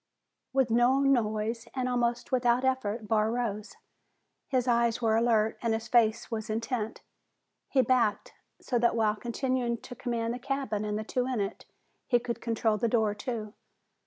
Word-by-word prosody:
With 265 Hz, -3 st, +2 dB
no 240 Hz, +3 st, +4 dB
noise, 230 Hz, -3 st, +1 dB
and 255 Hz, -1 st, -1 dB
almost 240 Hz, 0 st, -1 dB
without 250 Hz, 0 st, +2 dB
effort, 230 Hz, -4 st, -1 dB
Barr 215 Hz, 0 st, +2 dB
rose. 225 Hz, -3 st, -3 dB, 0.7 s
His 255 Hz, -2 st, 0 dB
eyes 235 Hz, -1 st, +2 dB
were 225 Hz, -2 st, +2 dB
alert 225 Hz, -1 st, +2 dB
and 230 Hz, -2 st, +1 dB
his 225 Hz, +1 st, -5 dB
face 230 Hz, -1 st, +2 dB
was 220 Hz, 0 st, -4 dB
intent. 225 Hz, 0 st, -3 dB, 0.7 s
He 265 Hz, -2 st, +3 dB
backed, 230 Hz, -4 st, +1 dB, 0.3 s
so 245 Hz, -, -1 dB
that 235 Hz, 0 st, +2 dB
while 215 Hz, -2 st, +2 dB
continuing 240 Hz, +1 st, -1 dB
to 240 Hz, -, -10 dB
command 235 Hz, -2 st, -2 dB
the 245 Hz, -, -5 dB
cabin 255 Hz, -6 st, -2 dB
and 210 Hz, 0 st, -2 dB
the 215 Hz, -, -3 dB
two 250 Hz, +3 st, -1 dB
in 255 Hz, -3 st, -1 dB
it, 200 Hz, +1 st, -4 dB, 0.4 s
he 245 Hz, -, +4 dB
could 240 Hz, 0 st, -4 dB
control 225 Hz, -2 st, 0 dB
the 235 Hz, -, +1 dB
door, 220 Hz, -2 st, +2 dB
too. 215 Hz, -1 st, -5 dB
235 Hz, 165 wpm, -29 LUFS, 220-245 Hz, 0.7 s, no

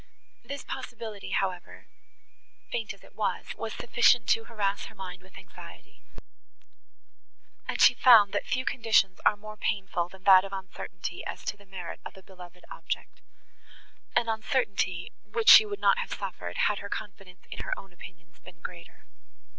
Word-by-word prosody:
This 280 Hz, 0 st, -6 dB
possibility, 230 Hz, -5 st, -7 dB
however, 185 Hz, -2 st, -3 dB, 0.9 s
faint 225 Hz, -3 st, -2 dB
as 195 Hz, -, -12 dB
it -, -, -18 dB
was, 215 Hz, -, -2 dB
was 225 Hz, -1 st, -5 dB
sufficient 240 Hz, -1 st, +3 dB
to 225 Hz, -, +2 dB
harass 205 Hz, -3 st, -2 dB
her -, -, -12 dB
mind 180 Hz, -2 st, -8 dB
with 190 Hz, 0 st, -17 dB
anxiety, 185 Hz, -2 st, -14 dB, 1.7 s
and -, -, -3 dB
she -, -, +8 dB
found, 220 Hz, -5 st, +7 dB
that -, -, -2 dB
few 255 Hz, 0 st, -1 dB
conditions 220 Hz, -5 st, +2 dB
are 210 Hz, -, +3 dB
more 215 Hz, +1 st, -10 dB
painful 190 Hz, -4 st, -2 dB
than 190 Hz, +1 st, -16 dB
that 190 Hz, -1 st, +8 dB
of 195 Hz, 0 st, -8 dB
uncertainty, 190 Hz, -2 st, -6 dB
as -, -, -7 dB
to -, -, -2 dB
the 200 Hz, -1 st, -20 dB
merit 185 Hz, -3 st, -7 dB
of -, -, -10 dB
a 190 Hz, -, -14 dB
beloved 180 Hz, -1 st, -14 dB
object; -, -, -6 dB, 0.9 s
an 235 Hz, -, +3 dB
uncertainty, 215 Hz, -5 st, -1 dB
which 455 Hz, 0 st, +1 dB
she 435 Hz, -, +10 dB
would 410 Hz, -1 st, -5 dB
not -, -, +3 dB
have 485 Hz, -, -4 dB
suffered, -, -, -6 dB
had 210 Hz, -, +1 dB
her 200 Hz, -, -8 dB
confidence 195 Hz, -3 st, -8 dB
in -, -, -6 dB
her -, -, -3 dB
own 195 Hz, -2 st, -12 dB
opinions 175 Hz, 0 st, -14 dB
been 170 Hz, -, -15 dB
greater. 170 Hz, 0 st, -10 dB
195 Hz, 160 wpm, -28 LUFS, 185-225 Hz, 1.7 s, she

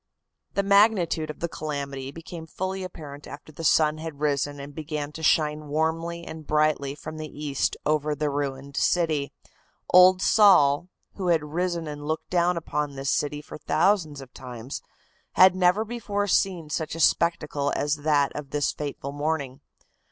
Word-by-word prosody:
The 200 Hz, -, +2 dB
magnitude 200 Hz, -6 st, +3 dB
of 150 Hz, -, -8 dB
the 170 Hz, -, 0 dB
calamity 140 Hz, -4 st, -5 dB
became 165 Hz, +2 st, -9 dB
fully 190 Hz, +3 st, -4 dB
apparent 150 Hz, -5 st, -9 dB
after 145 Hz, +2 st, -10 dB
the 160 Hz, +2 st, -9 dB
sun 155 Hz, 0 st, +3 dB
had 160 Hz, -3 st, -7 dB
risen 145 Hz, -1 st, 0 dB
and 140 Hz, +1 st, -8 dB
began 150 Hz, -1 st, -4 dB
to 160 Hz, -, -9 dB
shine 150 Hz, -1 st, +2 dB
warmly 165 Hz, +3 st, -1 dB
and 160 Hz, -1 st, -9 dB
brightly 150 Hz, -2 st, +1 dB
from 155 Hz, +1 st, -8 dB
the 155 Hz, 0 st, -5 dB
east 145 Hz, -2 st, -2 dB
over 150 Hz, 0 st, +1 dB
the 150 Hz, 0 st, -1 dB
ruined 140 Hz, -1 st, -4 dB
city. 155 Hz, -5 st, +1 dB, 0.6 s
Old 185 Hz, +1 st, +8 dB
Sol, 180 Hz, -7 st, +5 dB, 0.3 s
who 190 Hz, -2 st, -3 dB
had 165 Hz, -3 st, +3 dB
risen 170 Hz, +2 st, -2 dB
and 145 Hz, 0 st, -6 dB
looked 155 Hz, +1 st, -3 dB
down 175 Hz, 0 st, +2 dB
upon 150 Hz, -3 st, -3 dB
this 135 Hz, 0 st, -1 dB
city 150 Hz, 0 st, -1 dB
for -, -, -10 dB
thousands 160 Hz, -3 st, +1 dB
of 130 Hz, -1 st, -13 dB
times, 125 Hz, +1 st, -7 dB, 0.5 s
had 185 Hz, 0 st, +7 dB
never 185 Hz, +4 st, +3 dB
before 210 Hz, -3 st, -2 dB
seen 180 Hz, -5 st, +1 dB
such 155 Hz, +1 st, -2 dB
a -, -, -6 dB
spectacle 150 Hz, -4 st, +1 dB
as 145 Hz, +1 st, 0 dB
that 145 Hz, -2 st, +1 dB
of 145 Hz, -2 st, -6 dB
this 145 Hz, 0 st, 0 dB
fateful 140 Hz, -2 st, -5 dB
morning. 145 Hz, -2 st, -3 dB
155 Hz, 165 wpm, -25 LUFS, 145-170 Hz, 0.6 s, Old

